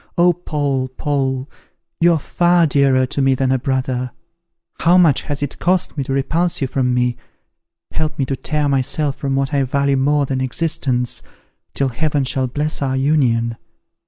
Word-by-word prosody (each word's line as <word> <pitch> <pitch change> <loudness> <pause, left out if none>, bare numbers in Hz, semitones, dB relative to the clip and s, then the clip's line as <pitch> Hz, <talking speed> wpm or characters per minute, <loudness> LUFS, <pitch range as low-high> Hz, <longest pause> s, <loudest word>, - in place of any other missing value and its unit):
Oh, 175 0 +5
Paul, 145 -6 -2
Paul! 135 -1 -2 0.5
you 170 0 +5
are 160 - +1
far 175 +3 +2
dearer 140 -3 +3
to 135 +2 -2
me 135 0 +3
than 130 0 0
a 130 - +2
brother! 130 -1 -1 0.7
How 175 +2 +4
much 165 -7 +4
has 145 -1 -4
it 145 - -5
cost 180 0 +1
me 140 - -2
to - - -4
repulse 165 +6 0
you 135 - 0
from 130 -1 0
me! 125 0 +1 0.7
Help 155 -1 -2
me 135 - 0
to 135 - -2
tear 150 +3 -1
myself 140 +1 0
from 135 -1 -2
what 135 +2 -1
I 140 - +2
value 140 +1 +1
more 145 +2 +2
than 130 -1 -2
existence, 130 -3 -1 0.5
till 135 -1 +1
Heaven 145 +3 0
shall 130 0 -1
bless 150 +5 -3
our 135 -1 0
union. 120 -5 +1
135 Hz, 175 wpm, -19 LUFS, 130-150 Hz, 0.7 s, Oh